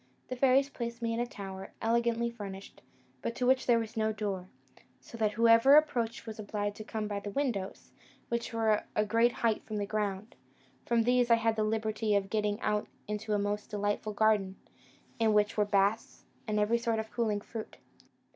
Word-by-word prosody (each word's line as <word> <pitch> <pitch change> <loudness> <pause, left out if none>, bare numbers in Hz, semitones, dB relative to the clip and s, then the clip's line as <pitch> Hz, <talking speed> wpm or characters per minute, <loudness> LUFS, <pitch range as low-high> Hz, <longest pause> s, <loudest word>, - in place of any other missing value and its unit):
The 255 - -3
fairies 270 +2 +4
placed 235 -3 -6
me 230 0 0
in 230 - -2
a 240 - 0
tower, 195 -4 -8
elegantly 235 +1 +1
furnished, 200 -4 -9 0.4
but 235 - -3
to 250 - -1
which 260 +1 +3
there 240 -2 +5
was 225 0 -4
no 220 -1 +1
door, 200 -4 -3 0.5
so - - -13
that 215 -1 +1
whoever 230 +4 +6
approached 240 -8 +2
was 220 -1 -8
obliged 205 -1 -3
to 215 - -6
come 215 0 -4
by 205 -1 -3
the 205 - -6
windows, 205 -5 -3 0.4
which 235 0 -2
were 220 -2 +2
a 210 - +2
great 230 +3 +3
height 220 -2 +1
from 215 -1 -5
the 205 - -1
ground: 205 0 -3 0.5
from 235 -1 +3
these 245 0 +3
I 230 - +7
had 225 -1 +1
the 215 - 0
liberty 215 0 0
of 195 -1 0
getting 210 -1 0
out 210 0 0 0.2
into 210 0 -2
a 205 0 0
delightful 205 +1 -2
garden, 205 -3 +2 0.6
in 220 -1 +3
which 210 0 +2
were 210 - +2
baths, 205 +2 0 0.2
and 210 -1 0
every 220 +3 +2
sort 230 -1 0
of 220 0 -4
cooling 215 -4 0
fruit. 220 +1 -8
220 Hz, 190 wpm, -31 LUFS, 205-235 Hz, 0.6 s, I